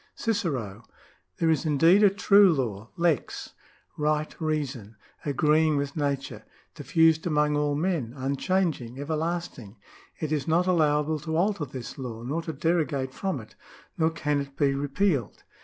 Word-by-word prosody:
2 -, -, -9 dB
Cicero. 125 Hz, -, -3 dB, 0.2 s
— -, -, -28 dB
" 90 Hz, 0 st, -49 dB
There 165 Hz, -1 st, +2 dB
is 155 Hz, -3 st, +1 dB
indeed 165 Hz, +6 st, +4 dB
a 205 Hz, -, +7 dB
true 200 Hz, 0 st, +5 dB
law 115 Hz, -8 st, -3 dB
{lex), 170 Hz, -5 st, -1 dB, 0.4 s
right 150 Hz, 0 st, -1 dB
reason, 140 Hz, -9 st, -3 dB, 0.3 s
agreeing 150 Hz, +2 st, +2 dB
with 140 Hz, 0 st, -3 dB
nature, 140 Hz, -3 st, -2 dB, 0.3 s
diffused 160 Hz, 0 st, +2 dB
among 150 Hz, -2 st, +2 dB
all 145 Hz, -1 st, +1 dB
men, 155 Hz, -7 st, -1 dB
unchanging, 135 Hz, -2 st, -1 dB
everlasting.... 155 Hz, -, -4 dB, 0.4 s
It 155 Hz, -1 st, -3 dB
is 150 Hz, -3 st, -1 dB
not 170 Hz, +3 st, +3 dB
allowable 155 Hz, -3 st, +2 dB
to 160 Hz, +2 st, -3 dB
alter 185 Hz, -3 st, +1 dB
this 130 Hz, +1 st, -8 dB
law, 115 Hz, -3 st, -6 dB
nor 145 Hz, +7 st, -2 dB
to 165 Hz, -, -5 dB
derogate 145 Hz, -4 st, 0 dB
from 190 Hz, -8 st, -2 dB
it. 110 Hz, -, -13 dB, 0.4 s
nor 160 Hz, -1 st, +2 dB
can 150 Hz, -3 st, -1 dB
it 140 Hz, 0 st, -9 dB
be 140 Hz, -1 st, +2 dB
repealed. 140 Hz, -, -1 dB
150 Hz, 155 wpm, -26 LUFS, 135-165 Hz, 0.4 s, a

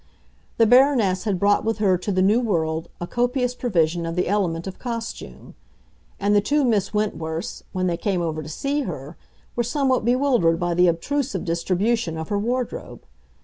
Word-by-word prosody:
The 230 Hz, -, +5 dB
Baroness 240 Hz, -6 st, +4 dB
had 200 Hz, -4 st, 0 dB
brought 205 Hz, +2 st, +3 dB
with 225 Hz, 0 st, -1 dB
her 200 Hz, -4 st, +3 dB
to 180 Hz, +3 st, -3 dB
the 185 Hz, -1 st, +2 dB
New 210 Hz, +5 st, +4 dB
World 160 Hz, -7 st, -1 dB
a 175 Hz, -, -3 dB
copious 245 Hz, +4 st, 0 dB
provision 175 Hz, -9 st, 0 dB
of 165 Hz, 0 st, -3 dB
the 180 Hz, -, 0 dB
element 175 Hz, -4 st, 0 dB
of 190 Hz, -, -7 dB
costume; 230 Hz, -, -6 dB, 0.7 s
and 205 Hz, +1 st, +2 dB
the 205 Hz, -, +5 dB
two 290 Hz, +7 st, +1 dB
Miss 210 Hz, -5 st, +1 dB
Wentworths, 165 Hz, -6 st, -3 dB
when 185 Hz, -1 st, -1 dB
they 175 Hz, -2 st, 0 dB
came 185 Hz, -3 st, -1 dB
over 155 Hz, -2 st, -2 dB
to 155 Hz, -, -8 dB
see 280 Hz, -, -1 dB
her, 155 Hz, -, -6 dB, 0.4 s
were 240 Hz, -, +1 dB
somewhat 260 Hz, +2 st, +1 dB
bewildered 240 Hz, -9 st, +2 dB
by 175 Hz, -1 st, 0 dB
the 180 Hz, +1 st, +4 dB
obtrusive 260 Hz, -, -1 dB
distribution 180 Hz, +2 st, 0 dB
of 160 Hz, 0 st, -5 dB
her 205 Hz, -, 0 dB
wardrobe. 245 Hz, +3 st, -3 dB
200 Hz, 180 wpm, -23 LUFS, 170-240 Hz, 0.7 s, The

